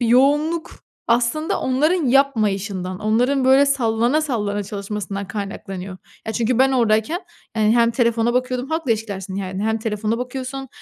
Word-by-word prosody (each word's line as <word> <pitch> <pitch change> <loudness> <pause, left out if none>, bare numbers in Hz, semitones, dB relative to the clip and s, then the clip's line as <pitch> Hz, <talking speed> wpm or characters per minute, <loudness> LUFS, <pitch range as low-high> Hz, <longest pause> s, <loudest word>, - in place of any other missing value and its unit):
yoğunluk 290 +7 +2 0.4
aslında 245 +9 +1
onların 305 +7 +1
yapmayışından, 205 -8 +1
onların, 245 +6 +2
böyle, 265 +2 +6
sallana 240 +1 +2
sallana 205 -8 -1
çalışmasından 200 -1 -5
kaynaklanıyor. 195 -2 -6 0.3
Ya, 220 - -2
çünkü 230 +2 0
ben 270 +1 +4
oradayken, 235 - +2 0.3
hani, 220 +1 +3
hem 235 0 +4
telefona 235 0 +1
bakıyordum, 255 +1 -1
halkla 320 -6 -1
ilişkilersin, 200 -4 -5
yani, 190 0 -4
hem 220 0 0
telefona 220 +1 -2
bakıyorsun 260 +1 -5
230 Hz, 135 wpm, -21 LUFS, 210-265 Hz, 0.4 s, böyle